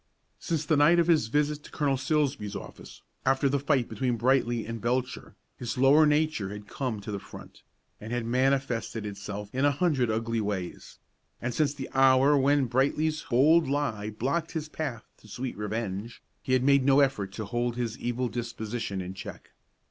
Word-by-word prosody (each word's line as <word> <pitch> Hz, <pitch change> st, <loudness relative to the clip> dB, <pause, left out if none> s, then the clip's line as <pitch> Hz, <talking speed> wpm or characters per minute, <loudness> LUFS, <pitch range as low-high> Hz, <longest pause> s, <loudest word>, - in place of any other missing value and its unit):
Since 160 Hz, -3 st, -2 dB
the 155 Hz, 0 st, +2 dB
night 150 Hz, +4 st, +5 dB
of 170 Hz, -, +4 dB
his 160 Hz, -9 st, +3 dB
visit 150 Hz, +4 st, 0 dB
to -, -, -13 dB
Colonel 145 Hz, -3 st, 0 dB
Silsbee's 135 Hz, -6 st, -1 dB
office, -, -, -10 dB, 0.2 s
after 135 Hz, +1 st, +2 dB
the 140 Hz, +1 st, +1 dB
fight 140 Hz, -3 st, +1 dB
between 125 Hz, -3 st, -1 dB
Brightly 120 Hz, -1 st, +1 dB
and 115 Hz, 0 st, -6 dB
Belcher, 125 Hz, +2 st, -2 dB, 0.2 s
his 120 Hz, 0 st, -4 dB
lower 140 Hz, +4 st, +6 dB
nature 150 Hz, -9 st, +1 dB
had 105 Hz, 0 st, -8 dB
come 125 Hz, -4 st, -3 dB
to 105 Hz, -, -6 dB
the 100 Hz, -, -3 dB
front, -, -, -13 dB, 0.4 s
and 110 Hz, +2 st, -8 dB
had 120 Hz, -1 st, -2 dB
manifested 125 Hz, -3 st, 0 dB
itself 105 Hz, 0 st, -6 dB
in 130 Hz, +2 st, 0 dB
a 145 Hz, -, +5 dB
hundred 140 Hz, -5 st, +1 dB
ugly 115 Hz, +1 st, -1 dB
ways; 100 Hz, -4 st, -5 dB, 0.4 s
and 120 Hz, +1 st, -3 dB
since 145 Hz, 0 st, +1 dB
the 135 Hz, -2 st, -6 dB
hour 135 Hz, +2 st, +5 dB
when 140 Hz, 0 st, +3 dB
Brightly's 145 Hz, +5 st, 0 dB
bold 150 Hz, +5 st, +4 dB
lie 115 Hz, -8 st, -1 dB
blocked 140 Hz, +11 st, -2 dB
his 160 Hz, -2 st, -3 dB
path 145 Hz, -7 st, -5 dB
to -, -, -18 dB
sweet 125 Hz, +5 st, -5 dB
revenge, 105 Hz, +1 st, -4 dB, 0.2 s
he 130 Hz, -, -2 dB
had 130 Hz, -1 st, +3 dB
made 140 Hz, 0 st, +4 dB
no 135 Hz, +1 st, +5 dB
effort 120 Hz, -9 st, 0 dB
to 110 Hz, -, -5 dB
hold 120 Hz, +2 st, -2 dB
his 120 Hz, -2 st, -2 dB
evil 120 Hz, +1 st, -1 dB
disposition 115 Hz, -4 st, -4 dB
in 90 Hz, +1 st, -6 dB
check. 100 Hz, +1 st, -10 dB
130 Hz, 180 wpm, -28 LUFS, 115-145 Hz, 0.4 s, lower